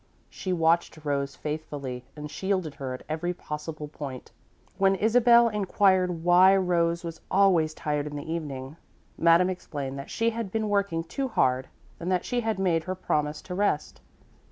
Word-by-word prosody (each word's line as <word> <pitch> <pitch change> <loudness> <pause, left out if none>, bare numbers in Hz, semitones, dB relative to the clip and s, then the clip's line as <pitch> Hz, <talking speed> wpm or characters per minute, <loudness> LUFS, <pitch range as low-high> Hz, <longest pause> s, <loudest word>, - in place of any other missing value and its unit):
She 185 - -4
watched 165 -1 +2
Rose 140 -1 -1
faithfully 145 -5 -5
and 150 0 -7
shielded 185 -4 -1
her 130 -2 -5
at - - -11
every 175 +3 -2
possible 150 -1 -6
point. 140 -4 -8 0.5
When 195 0 +4
Isabel 235 +3 +5
inquired 190 -4 +2
why 180 +2 +6
Rose 170 -2 +1
was 165 -1 -7
always 180 -5 +3
tired 150 -1 -2
in 145 - -6
the 145 - -5
evening, 140 -3 -5 0.4
Madame 170 +2 +4
explained 140 -6 -5
that 140 - -8
she 230 0 +1
had 225 -4 -4
been 220 0 -1
working 200 -5 0
too 270 +11 -3
hard 130 - +1 0.3
and 175 +2 -3
that 180 -1 +1
she 245 - -1
had 225 -3 -1
made 170 -4 +1
her 185 0 -3
promise 150 -4 -1
to 180 - -7
rest. 190 -5 -1
170 Hz, 165 wpm, -27 LUFS, 150-195 Hz, 0.5 s, why